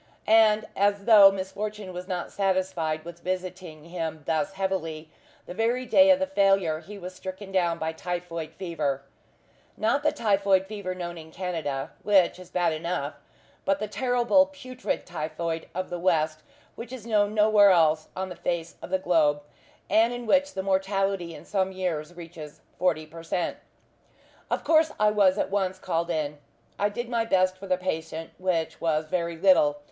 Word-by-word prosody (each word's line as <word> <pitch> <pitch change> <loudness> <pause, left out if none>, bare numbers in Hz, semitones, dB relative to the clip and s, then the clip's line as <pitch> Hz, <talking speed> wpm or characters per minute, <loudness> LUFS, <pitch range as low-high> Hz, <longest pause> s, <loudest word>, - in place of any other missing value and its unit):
And 215 -1 +5
as 200 0 +1
though 205 -4 +9
misfortune 195 +1 -5
was 180 +1 -7
not 180 -3 -4
satisfied 185 -5 -1
with 170 0 -9
visiting 185 -3 -5
him 165 -3 -5
thus 190 +5 0
heavily, 165 -5 -3 0.3
the - - -7
very 235 +5 0
day 285 +3 +6
of 280 - +7
the 285 - 0
failure 195 - +2
he 205 +5 -10
was 185 -1 -8
stricken 190 +2 -8
down 175 -3 +1
by 160 -1 -2
typhoid 170 -2 -5
fever: 150 -7 -2 0.7
not 225 +6 +1
the 300 0 +2
typhoid 200 -7 +2
fever 195 -3 -5
known 175 -1 -6
in 160 0 -11
Canada 160 -7 -3
which 190 -4 +3
is 180 -1 -12
bad 175 -3 +1
enough 155 -2 -3 0.5
but 195 0 +1
the 215 +1 -3
terrible 245 +5 +3
putrid 255 -3 -5
typhoid 165 0 -4
of 185 +1 -3
the 175 - -3
west, 155 -3 +1 0.3
which 230 +1 -9
is 255 -4 -8
known 210 -2 +1
nowhere 210 -1 +6
else 160 -3 +3
on 190 0 -3
the 180 - -7
face 170 0 -3
of - - -8
the 190 - +2
globe, 155 -5 +2 0.4
and 225 +2 +4
in 245 0 -6
which 285 +5 +2
the 190 - -2
mortality 195 -2 0
in - - -12
some 190 -2 0
years 175 -3 -3
reaches 165 -3 -10 0.2
forty 165 -4 +1
per 165 +2 -11
cent. 170 +1 -2 0.9
Of - - -1
course 320 -1 +4
I 210 0 +4
was 200 -2 +4
at - - -1
once 190 -2 0
called 170 -2 -2
in. 150 -3 -2 0.4
I 205 - +2
did 240 +4 -5
my 235 -1 0
best 185 -4 +2
for 195 +1 -10
the 185 -1 +2
patient, 160 -3 -4
which 180 -3 -1
was 155 -2 +1
very 170 0 -2
little. 165 -5 +4
185 Hz, 175 wpm, -26 LUFS, 165-205 Hz, 0.9 s, though